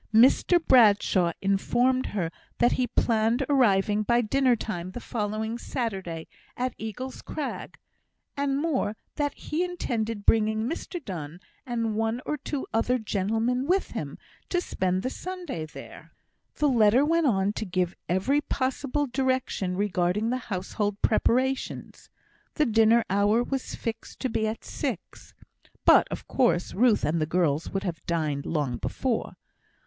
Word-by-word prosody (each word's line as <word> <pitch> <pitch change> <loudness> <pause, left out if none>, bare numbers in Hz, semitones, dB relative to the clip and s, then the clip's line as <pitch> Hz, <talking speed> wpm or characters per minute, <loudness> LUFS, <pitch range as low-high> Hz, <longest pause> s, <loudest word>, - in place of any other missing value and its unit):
Mr 250 +10 +5
Bradshaw 205 -7 +5
informed 240 +6 +2
her, 175 -5 -2 0.3
that 240 - +4
he 255 - +1
planned 230 +3 +1
arriving 210 -6 +3
by 235 +3 +2
dinner 255 +2 +3
time 185 -6 -5
the - - -5
following 220 0 -3
Saturday 190 -12 -4 0.3
at 250 0 -1
Eagle's 250 +4 -6
Crag; 300 - -5 0.6
and 280 -1 0
more, 275 -9 0 0.2
that 290 -1 -1
he 320 +4 -2
intended 230 - -3
bringing 220 0 +3
Mr 335 +2 -5
Donne 165 -4 -6 0.3
and 230 -2 -1
one 225 +2 0
or 300 - -1
two 285 0 -4
other 240 +3 +2
gentlemen 225 +4 -1
with 380 +3 +1
him, - - -5 0.3
to 355 - +1
spend 185 - -1
the 255 - -2
Sunday 350 - -5
there! - - -12 0.4
The 300 - +2
letter 240 +1 +4
went 330 0 +2
on 200 -3 +2
to 220 - -3
give 180 -2 -1 0.2
every 225 +12 +2
possible 275 +1 -1
direction 255 -8 -1
regarding 200 +2 0
the 255 - 0
household 205 +2 -2
preparations. 260 +4 0 0.5
The 305 - +3
dinner 225 0 +4
hour 205 +4 +3
was 270 +1 -4
fixed 225 -1 -6
to 260 - 0
be 220 -1 0
at 220 +1 -4
six; - - -5 0.5
but, - - +7
of - - -6
course, 180 -10 +1
Ruth 225 -2 +3
and 155 +2 0
the 155 - 0
girls 160 -3 +1
would 195 - -3
have 175 -4 -4
dined 155 -4 -1
long 145 -7 -1
before. 250 -4 -2
225 Hz, 145 wpm, -27 LUFS, 195-260 Hz, 0.6 s, but